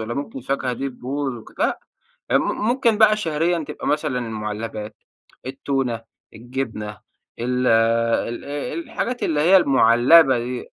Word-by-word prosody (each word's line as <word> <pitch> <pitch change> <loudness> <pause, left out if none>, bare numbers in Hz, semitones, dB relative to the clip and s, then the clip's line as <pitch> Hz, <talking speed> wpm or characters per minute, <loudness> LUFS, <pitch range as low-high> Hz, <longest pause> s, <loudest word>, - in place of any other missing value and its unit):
والّا 110 +2 -4
ممكن 140 0 -5
الفاكهة 130 0 -2
دي 135 +3 -3
تبوظ 135 +1 -4
وك 115 - -13
لأ، - - +1 0.5
م - - +4 0.3
ممكن 240 -3 +2
بقى 215 -1 +6
شهريًا 165 -2 0
تبقى 150 - -6
مثلًا 150 -4 0
المعلبات، 110 -1 -5 0.5
التونة، 130 -3 -2 0.3
الجبنة، 115 -3 -5 0.4
ال 125 +1 -1
ال 115 +1 +2 0.4
الحاجات 245 0 -3
اللي 150 -2 +1
هي 180 +5 +6
المعلبة 130 -1 +5
دي، 120 +1 -4
125 Hz, 130 wpm, -22 LUFS, 115-150 Hz, 0.5 s, بقى